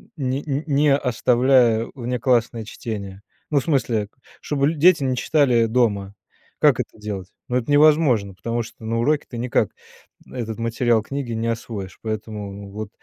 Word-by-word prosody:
не 135 Hz, -1 st, -2 dB, 0.2 s
не 145 Hz, -1 st, +4 dB
оставляя 125 Hz, -2 st, +3 dB
внеклассное 120 Hz, -2 st, 0 dB
чтение? 105 Hz, -5 st, -6 dB, 0.3 s
Ну, 145 Hz, -, +4 dB
в -, -, -5 dB
смысле, 115 Hz, -9 st, 0 dB, 0.3 s
чтобы 140 Hz, -1 st, 0 dB
ль 165 Hz, -, 0 dB
дети 165 Hz, -2 st, +5 dB
не 130 Hz, -1 st, 0 dB
читали 125 Hz, -7 st, +3 dB
дома. 105 Hz, -4 st, 0 dB, 0.4 s
Как -, -, +4 dB
это -, -, -4 dB
делать? 100 Hz, -3 st, -5 dB, 0.2 s
Ну, 125 Hz, -, -2 dB
это 125 Hz, +3 st, -2 dB
невозможно, 145 Hz, -, +4 dB
потому 115 Hz, +4 st, -3 dB
что 115 Hz, -, -13 dB
на 115 Hz, +1 st, -1 dB
уроке 150 Hz, +5 st, +1 dB
ты 120 Hz, -, -7 dB
никак 120 Hz, +1 st, +1 dB, 0.6 s
этот 115 Hz, -3 st, -5 dB
материал 115 Hz, 0 st, +1 dB
книги 135 Hz, +1 st, -5 dB
не 115 Hz, 0 st, -2 dB
освоишь. 110 Hz, -4 st, -5 dB
Поэтому 105 Hz, -2 st, -5 dB
вот, 105 Hz, 0 st, -6 dB
120 Hz, 150 wpm, -22 LUFS, 110-135 Hz, 0.6 s, дети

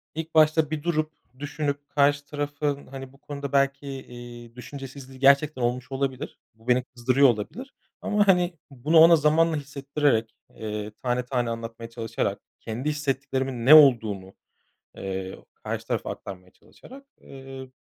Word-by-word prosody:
ilk 160 Hz, 0 st, -6 dB
başta 155 Hz, 0 st, +4 dB
bir 150 Hz, -2 st, -3 dB
durup 155 Hz, -2 st, -1 dB, 0.3 s
düşünüp 145 Hz, -1 st, -3 dB
karşı 145 Hz, 0 st, +2 dB
tarafın, 145 Hz, -1 st, -3 dB
hani, 135 Hz, 0 st, -9 dB
bu -, -, -19 dB
konuda 140 Hz, -1 st, -7 dB
belki, 140 Hz, +1 st, +1 dB
iii, 120 Hz, -3 st, -9 dB
düşüncesizliği 135 Hz, 0 st, -10 dB
gerçekten 140 Hz, +1 st, +4 dB
olmuş 125 Hz, +2 st, -1 dB
olabilir. 135 Hz, -1 st, -3 dB, 0.2 s
Bu 115 Hz, +2 st, -23 dB
beni 125 Hz, 0 st, +3 dB
kızdırıyor 130 Hz, +2 st, +3 dB
olabilir 175 Hz, -, -4 dB, 0.3 s
ama, 205 Hz, -1 st, +1 dB
hani, 180 Hz, -2 st, +3 dB, 0.2 s
bunu 145 Hz, +6 st, +1 dB
ona 165 Hz, +1 st, +9 dB
zamanla 160 Hz, +2 st, +3 dB
hissettirerek, 140 Hz, -4 st, -1 dB, 0.2 s
eee, 105 Hz, -1 st, -5 dB
tane 125 Hz, 0 st, 0 dB
tane 125 Hz, -2 st, -1 dB
anlatmaya 115 Hz, 0 st, -6 dB
çalışarak, 115 Hz, -1 st, -3 dB, 0.2 s
kendi 120 Hz, +6 st, -4 dB
hissettiklerimin 135 Hz, -4 st, -2 dB
ne 150 Hz, -, +9 dB
olduğunu, 110 Hz, -10 st, +5 dB, 0.6 s
eee, 95 Hz, -1 st, -5 dB
karşı -, -, -6 dB
tarafa -, -, -2 dB
aktarmaya 90 Hz, -2 st, -9 dB
çalışarak, 275 Hz, +2 st, -16 dB, 0.2 s
eee, 135 Hz, -1 st, -10 dB
135 Hz, 140 wpm, -25 LUFS, 120-150 Hz, 0.6 s, ona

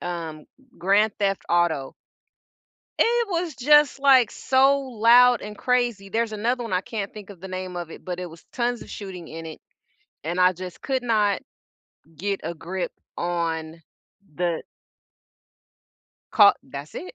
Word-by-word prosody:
um, 165 Hz, -3 st, -5 dB
G 270 Hz, -, -25 dB
grand 200 Hz, +3 st, +3 dB
Theft 195 Hz, -1 st, 0 dB
Auto? 170 Hz, -6 st, +1 dB, 1.1 s
It 470 Hz, -1 st, +3 dB
was 340 Hz, -4 st, -2 dB
just, 295 Hz, +2 st, +5 dB
like, 265 Hz, -4 st, +6 dB
so 270 Hz, +1 st, +3 dB
loud 245 Hz, -1 st, +5 dB
and 210 Hz, 0 st, -8 dB
crazy, 240 Hz, -6 st, 0 dB
there's 230 Hz, 0 st, 0 dB
another 240 Hz, +4 st, -1 dB
one, 230 Hz, -, -6 dB
I 185 Hz, -, +1 dB
can't 205 Hz, -3 st, -5 dB
think 210 Hz, -1 st, -10 dB
of 185 Hz, -, -12 dB
the 190 Hz, -, -8 dB
name 185 Hz, -1 st, -5 dB
of 175 Hz, -2 st, -5 dB
it, -, -, -11 dB
but 180 Hz, -1 st, -4 dB
it 180 Hz, -, -4 dB
was 165 Hz, -1 st, -13 dB
tons 245 Hz, 0 st, -1 dB
of -, -, -12 dB
shooting 185 Hz, -5 st, -8 dB
in 165 Hz, 0 st, -8 dB
it. 160 Hz, -, -9 dB, 0.6 s
And 170 Hz, +3 st, -2 dB
I 180 Hz, 0 st, +5 dB
just 180 Hz, 0 st, -9 dB
could 260 Hz, -2 st, -1 dB
not 210 Hz, -4 st, +2 dB, 0.7 s
get 195 Hz, +5 st, -2 dB
a 170 Hz, -, -3 dB
grip 180 Hz, +3 st, -4 dB, 0.3 s
on 165 Hz, -2 st, -2 dB, 0.5 s
the 175 Hz, 0 st, -1 dB, 1.7 s
Call 205 Hz, -2 st, +7 dB
That's 140 Hz, +2 st, -9 dB
it. 370 Hz, -, -7 dB
200 Hz, 160 wpm, -24 LUFS, 175-245 Hz, 1.7 s, Call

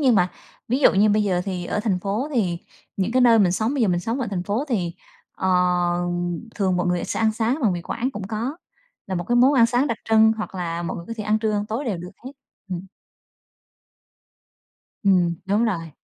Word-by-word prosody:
Nhưng 260 Hz, -5 st, +4 dB
mà 180 Hz, -3 st, +3 dB, 0.4 s
ví 255 Hz, +3 st, +1 dB
dụ -, -, +6 dB
như 210 Hz, +2 st, +4 dB
bây 210 Hz, +1 st, +3 dB
giờ 185 Hz, -3 st, +1 dB
thì 185 Hz, -3 st, -3 dB
ở 210 Hz, -, -1 dB
thành 200 Hz, -5 st, 0 dB
phố 210 Hz, +9 st, -2 dB
thì 180 Hz, -7 st, 0 dB, 0.4 s
những 195 Hz, +4 st, -1 dB
cái 255 Hz, -, +3 dB
nơi 230 Hz, -2 st, +6 dB
mình 185 Hz, -4 st, +4 dB
sống 225 Hz, +8 st, 0 dB
bây 265 Hz, -, +1 dB
giờ 215 Hz, -, +3 dB
mình 175 Hz, -1 st, +1 dB
sống 230 Hz, +8 st, -2 dB
ở 245 Hz, -, -1 dB
thành 180 Hz, -3 st, -2 dB
phố 210 Hz, +8 st, -1 dB
thì, 180 Hz, -8 st, -1 dB, 0.4 s
ờ, 190 Hz, -, -2 dB, 1.1 s
thường 190 Hz, -3 st, +1 dB
mọi 180 Hz, 0 st, 0 dB
người 180 Hz, 0 st, 0 dB
sẽ -, -, -3 dB
ăn 220 Hz, -1 st, +3 dB
sáng 230 Hz, +6 st, 0 dB
bằng 205 Hz, -5 st, +3 dB
mì 175 Hz, -1 st, -4 dB
Quảng 255 Hz, +7 st, -2 dB
cũng 205 Hz, -6 st, -6 dB
có, 230 Hz, +9 st, -3 dB, 0.5 s
là 190 Hz, -, -3 dB
một 175 Hz, -1 st, -2 dB
cái 240 Hz, -, +3 dB
món 260 Hz, +4 st, +6 dB
ăn 230 Hz, -3 st, +6 dB
sáng 245 Hz, +4 st, +1 dB
đặc 230 Hz, -3 st, -2 dB
trưng 220 Hz, 0 st, +6 dB
hoặc 215 Hz, -2 st, -5 dB
là 170 Hz, -1 st, -3 dB
mọi 170 Hz, -, -4 dB
người 170 Hz, -, -8 dB
có 230 Hz, -, -5 dB
thể 215 Hz, -, -4 dB
ăn 215 Hz, 0 st, +2 dB
trưa, 220 Hz, -1 st, 0 dB
ăn 205 Hz, 0 st, -1 dB
tối 230 Hz, +7 st, -3 dB
đều 210 Hz, -7 st, -1 dB
được 180 Hz, +2 st, -8 dB
hết, 265 Hz, -, -7 dB, 0.4 s
ừm. 180 Hz, +1 st, -4 dB, 2.2 s
Ừm, 180 Hz, -3 st, +3 dB
đúng 205 Hz, +4 st, +2 dB
rồi. 165 Hz, -8 st, -2 dB
210 Hz, 230 wpm, -23 LUFS, 180-230 Hz, 2.2 s, dụ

